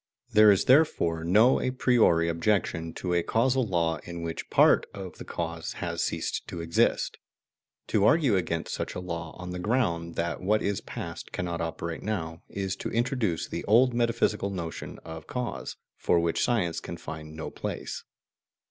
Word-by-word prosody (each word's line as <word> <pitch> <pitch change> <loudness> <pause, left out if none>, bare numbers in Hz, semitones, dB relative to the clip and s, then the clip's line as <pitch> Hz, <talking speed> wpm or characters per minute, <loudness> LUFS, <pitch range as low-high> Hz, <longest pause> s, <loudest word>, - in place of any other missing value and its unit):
There 105 0 +8
is 100 - +2
therefore 125 - +3
no 105 +9 +5
a - - 0
priori 120 -10 +3
objection 85 -1 0
to 90 -1 -2
a 85 - +3
causal 125 +6 +1
law 85 -3 +1
in 85 -1 -7
which 80 -1 -5
part - - +5
of 95 -4 -8
the - - -6
cause 85 -1 -4
has - - -3
ceased - - -2
to 85 - -6
exist. 85 0 +1 0.7
To 105 - +2
argue 145 -3 +4
against 85 -3 -1
such - - -4
a - - -3
law 85 -3 -5
on 90 0 -6
the 90 - -4
ground 90 -6 0
that 85 0 -2
what 105 +3 +2
is 100 -1 -1
past - - -7
cannot 85 -2 -3
operate 80 0 -4
now, 85 -6 -3
is 95 -1 -3
to - - -4
introduce 115 - 0
the - - -4
old 120 +4 +5
metaphysical 115 -4 +1
notion 85 -4 -5
of 80 -1 -8
cause, 125 -1 -4 0.2
for 85 - +2
which 85 -1 +1
science 90 -9 +1
can - - -7
find 75 0 -8
no 80 - -5
place. - - -5
90 Hz, 170 wpm, -28 LUFS, 85-110 Hz, 0.7 s, There